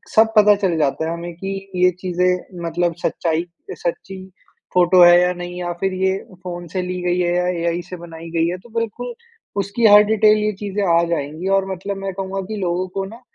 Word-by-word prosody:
सब 220 0 +5
पता 210 -1 +7
चल 175 -4 +2
जाता 150 +1 0
है 165 - -2
हमें 170 +1 -6
की 195 +3 -5 0.3
ये 180 - +6
चीज़ें 180 0 -1
मतलब 170 0 0
सच्चाई 165 0 -1 0.3
सच्ची 190 +2 -4 0.6
फ़ोटो 180 0 +6
है 175 0 +8
या 180 0 +2
नहीं 175 0 -7
या 175 -1 -3
फ़िर 190 -1 0
ये 190 +1 +1 0.3
फ़ोन 175 -1 -6
से 185 - 0
ली 180 0 -4
गयी 180 0 +1
है 175 0 +1
या 180 0 +1
एआई 170 +1 -1
से 185 - -5
बनाई 165 -1 -10
गयी 165 -1 +1
है। 180 - -3
तो 210 +6 -17
बिल्कुल, 230 - -4 0.4
उसकी 200 +4 0
हर 210 0 +8
डिटेल 215 0 +4
ये 210 0 0
चीज़ें 205 0 -2 0.2
आ 170 - +2
जाएँगी 160 +2 -3
और 195 0 -2
मतलब 195 +2 -4
मैं 195 0 -4
कहूँगा 195 +1 -4
कि - - -2
लोगों 180 +1 -1
को 195 +1 -4
ना 225 +5 -11
180 Hz, 210 wpm, -20 LUFS, 175-195 Hz, 0.6 s, है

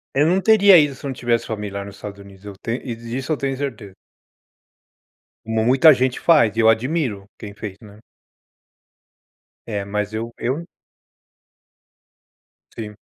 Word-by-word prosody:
Eu 145 +3 +3
não 180 +3 +3
teria 200 -2 +6
ido 145 -3 +3
se 130 - -16
eu - - -2
não - - -3
tivesse 120 -2 -1
família 105 -2 -5
lá 100 - -6
nos 100 0 -10
Estados 100 0 -9
Unidos, 100 0 -15
eu 100 - -7
tenho 120 +2 -3
e 120 -3 -4
disso 120 +6 -5
eu 150 - +1
tenho 135 -1 -2
certeza. 115 -8 -6 1.5
Mu 110 0 0
muita 135 +5 +7
gente 130 0 0
faz, 150 -11 +4
e 115 - -2
eu 110 - +5
admiro 115 -4 -1
quem 105 -2 -9
fez, 100 -2 -8
né. 105 -1 -14 1.7
É, 105 -3 -3
mas 105 +1 -3
eu 115 +2 -4
eu 135 +8 -3 2.1
Sim. 105 -2 -7
115 Hz, 160 wpm, -21 LUFS, 105-135 Hz, 2.1 s, muita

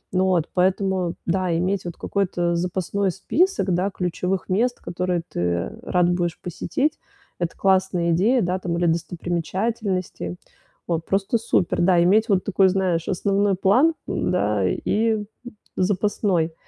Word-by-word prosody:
Ну, 185 0 +3
от, 165 -2 0
поэтому, 185 -1 +1
да, 175 -1 0
иметь 185 +1 -1
вот 175 - -5
какой-то 175 -3 -1
запасной 185 +3 -1
список, 220 - +1
да, 185 +3 +1
ключевых 180 0 -2
мест, 235 +6 0
которые 180 -1 -2
ты 85 0 -2
рад 180 -1 +2
будешь 175 -1 -1
посетить- 265 - -2 0.4
это 175 -2 -3
классная 185 -3 +2
идея, 225 +8 +3
да, 180 +1 -1
там, 170 -2 -2
или 175 - +1
достопримечательности. 175 - -2 0.5
Вот, 165 -2 -1
просто 195 +4 +1
супер. 190 -7 +1
Да, 175 -1 +4
иметь 215 +6 +3
вот 190 -2 +2
такой, 195 -1 +3
знаешь, 180 -3 0
основной 195 +1 +1
план, 255 - +3
да, 105 - 0
и 220 - 0 0.5
запасной. 185 -3 0
185 Hz, 135 wpm, -23 LUFS, 175-200 Hz, 0.5 s, Да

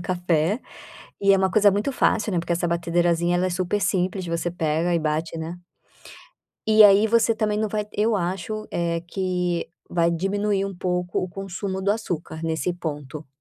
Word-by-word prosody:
café. 175 +2 0 0.6
E 200 0 +5
é - - +4
uma 190 0 +1
coisa 205 +1 +5
muito 205 +8 -1
fácil, 215 -4 +1
né, 175 - +1
porque 170 +1 -2
essa 175 +1 0
batedeirazinha 170 0 +1
ela 185 +1 +1
é - - -1
super 185 +3 -1
simples 185 -1 0
você 170 +1 -2
pega 165 0 0
e 170 - +3
bate, 155 +1 -2
né 165 +2 -6 1.1
E 215 0 +7
aí, 205 +1 +7
você 230 +1 +3
também 215 -1 -1
não 215 0 0
vai 210 0 -2
eu 215 +1 +1
acho, 190 +4 -3
eh, 170 -1 -1
que 180 -2 -2 0.2
vai 170 -1 +2
diminuir 195 +3 0
um 195 -1 -5
pouco 180 0 -1
o 185 - -3
consumo 190 +1 -5
do 200 +2 +2
açúcar, 170 -7 -4
nesse 160 +1 -1
ponto. 150 -3 -6
180 Hz, 180 wpm, -24 LUFS, 170-200 Hz, 1.1 s, E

